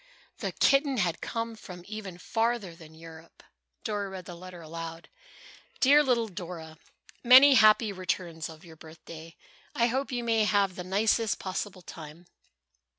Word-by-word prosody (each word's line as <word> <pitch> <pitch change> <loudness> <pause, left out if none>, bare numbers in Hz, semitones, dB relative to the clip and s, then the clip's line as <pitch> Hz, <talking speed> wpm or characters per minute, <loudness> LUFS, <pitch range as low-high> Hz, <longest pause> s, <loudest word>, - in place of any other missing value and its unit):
The - - -3
kitten 275 -1 +3
had 175 -5 -1
come 230 0 -4
from 180 -4 -11
even 200 -4 -7
farther 225 -1 -1
than 160 -2 -15
Europe! 165 0 -14 0.4
Dora 205 -2 -3
read 190 -1 -8
the 175 - -8
letter 180 +1 -11
aloud. 165 +1 -8 0.7
"DEAR 285 +3 +6
LITTLE 240 -5 +1
DORA: 170 -4 -8 0.4
"Many 260 +3 +8
happy 215 -2 +5
returns 175 -3 -4
of 160 +2 -13
your 165 -2 -13
birthday! 160 +1 -12 0.4
I 235 - +3
hope 265 +4 -1
you 245 -1 -2
may 225 -2 +2
have 200 -3 +1
the 180 - -6
nicest 215 +4 +1
possible 185 0 -5
time. 160 +2 -11
185 Hz, 150 wpm, -28 LUFS, 165-225 Hz, 0.7 s, Many